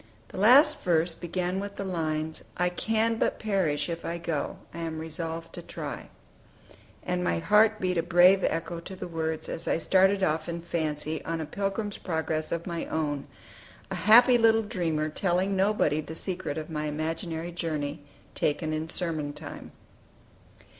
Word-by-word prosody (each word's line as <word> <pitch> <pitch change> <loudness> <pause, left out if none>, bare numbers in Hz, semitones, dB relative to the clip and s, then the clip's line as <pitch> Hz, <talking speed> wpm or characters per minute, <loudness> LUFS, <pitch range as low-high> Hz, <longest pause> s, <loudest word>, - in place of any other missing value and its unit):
The - - -10
last 285 +8 +6
verse 170 -1 +2
began 180 +2 -2
with 200 0 -5
the - - -4
lines, 160 -4 -2
"I 180 0 +2
can 225 +4 0
but - - +1
perish 190 -9 0
if 170 -1 -4
I 170 - -3
go: 165 -3 -3 0.2
I 170 - -7
am 165 -1 -3
resolved 165 +1 -5
to - - -7
try:" - - -7 0.9
and 180 0 -1
my - - +1
heart 210 +5 +4
beat 180 -2 0
a - - +3
brave 175 +3 +5
echo 165 +1 -1
to 190 +3 -9
the - - -6
words, 160 -2 -2
as 165 - -5
I - - +2
started 190 +3 +3
off 155 -1 0
in 170 0 -4
fancy 155 -2 -2
on 165 0 -3
a 160 - -3
"Pilgrim's 200 +5 -3
Progress" 160 -2 -2
of 170 0 -2
my 170 -2 -4
own, 145 -3 -2 0.6
a - - -1
happy 240 +2 +8
little 225 -1 +5
dreamer, 165 -7 -1
telling 185 +4 0
nobody 190 -6 +2
the 160 +1 -8
secret 180 -4 -3
of 155 +1 -5
my 150 -1 -2
imaginary 160 +2 -3
journey, 155 -3 -3 0.3
taken 155 +1 -1
in 155 +1 -3
sermon 160 -4 -2
time. - - -9
170 Hz, 165 wpm, -28 LUFS, 160-190 Hz, 0.9 s, happy